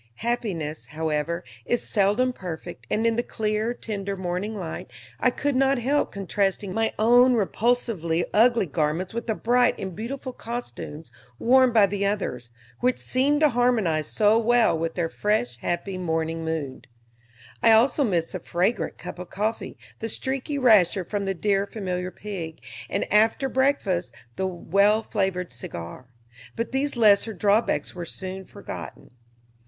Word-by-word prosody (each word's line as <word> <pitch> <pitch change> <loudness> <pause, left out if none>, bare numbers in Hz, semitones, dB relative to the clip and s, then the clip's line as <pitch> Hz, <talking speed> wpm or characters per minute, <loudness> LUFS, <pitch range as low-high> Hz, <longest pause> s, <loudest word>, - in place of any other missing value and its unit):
Happiness, 185 -11 -2
however, 160 +2 -2 0.2
is 240 - -1
seldom 215 +5 +2
perfect, 175 -4 -8
and 220 +2 0
in 230 0 +2
the - - +3
clear, 215 0 -1
tender 200 -4 -4
morning 185 +4 -3
light 175 -6 -6 0.3
I - - +4
could 285 -2 -1
not 270 +1 +3
help 270 +5 +1
contrasting 195 0 -1
my 225 +2 +1
own 245 +3 +5
repulsively 210 -6 0
ugly 230 0 +4
garments 160 +4 -1
with 235 +1 -4
the 220 - 0
bright 245 +2 +2
and 190 -3 -5
beautiful 255 +4 -5
costumes 225 - -7 0.3
worn 255 - +5
by 220 -3 +6
the 200 0 -2
others, 200 - -2 0.3
which 250 0 +2
seemed 285 +4 +1
to 305 - +6
harmonize 225 - +1
so 215 +1 +3
well 235 -2 +3
with 165 0 -2
their 170 -2 0
fresh, 165 - -1
happy 185 - -3
morning 165 -1 -1
mood. 160 -5 -4 0.7
I 230 - +6
also 245 +6 +4
missed 175 -9 0
the 185 - -4
fragrant 180 +7 -1
cup - - -8
of 180 - -7
coffee, 215 +3 -3 0.2
the 225 - -3
streaky 270 +5 -2
rasher 205 -8 +4
from 205 +1 -3
the 195 0 -1
dear 200 +2 +1
familiar 185 -4 -3
pig, 185 -5 -7 0.3
and, 200 - -1
after 220 +5 +4
breakfast, 260 -10 0 0.2
the 190 - -1
well 200 +5 +2
flavored 190 -4 -1
cigar; 115 0 -8 0.5
but 230 - -3
these 270 0 -1
lesser 215 0 +4
drawbacks 205 +4 +1
were 175 -2 -6
soon 190 +2 -6
forgotten. - - -9
205 Hz, 150 wpm, -25 LUFS, 175-235 Hz, 0.7 s, by